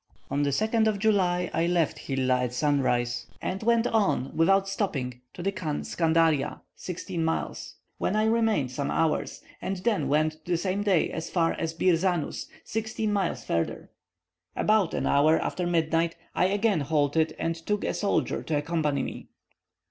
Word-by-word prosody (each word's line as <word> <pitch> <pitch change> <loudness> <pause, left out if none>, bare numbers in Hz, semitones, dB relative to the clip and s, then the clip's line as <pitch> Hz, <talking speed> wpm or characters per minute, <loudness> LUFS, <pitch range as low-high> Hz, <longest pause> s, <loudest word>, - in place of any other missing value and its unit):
On 140 - +1
the 145 - +2
2nd 220 - +2
of 215 -2 +1
July 185 -4 +1
I 165 - +1
left 175 -3 +1
Hilla 130 -2 0
at 125 -1 -2
sunrise, 120 -4 +1
and 190 - -3
went 235 +1 +3
on, 200 - +1
without 195 +4 +3
stopping, 135 - -2
to 175 - -6
the 195 - +1
Khan 155 -6 -3
Scandaria 160 -3 +1
(sixteen 180 -1 -4
miles), 160 0 -3 0.2
where 210 - 0
I 215 - +3
remained 220 - +2
some 140 +2 -2
hours; 165 -1 0 0.2
and 195 0 -2
then 210 +2 0
went 155 +1 +1
the 175 -1 0
same 190 +3 -1
day 195 -5 +2
as 160 0 -4
far 165 -2 +1
as 165 0 -3
Bir 180 +1 +3
Zanus, 175 -3 -1 0.2
sixteen 220 -1 -2
miles 195 -4 -1
further. 85 0 -2 0.6
About 210 -5 +2
an - - -1
hour 155 +3 +4
after 180 -1 -2
midnight 165 0 +1 0.2
I - - +2
again 200 -1 +2
halted, 150 +2 +1
and 165 - -1
took 205 +5 -2
a - - -1
soldier 200 - 0
to 155 - -1
accompany 150 -3 0
me. - - -7
165 Hz, 165 wpm, -27 LUFS, 150-195 Hz, 0.6 s, hour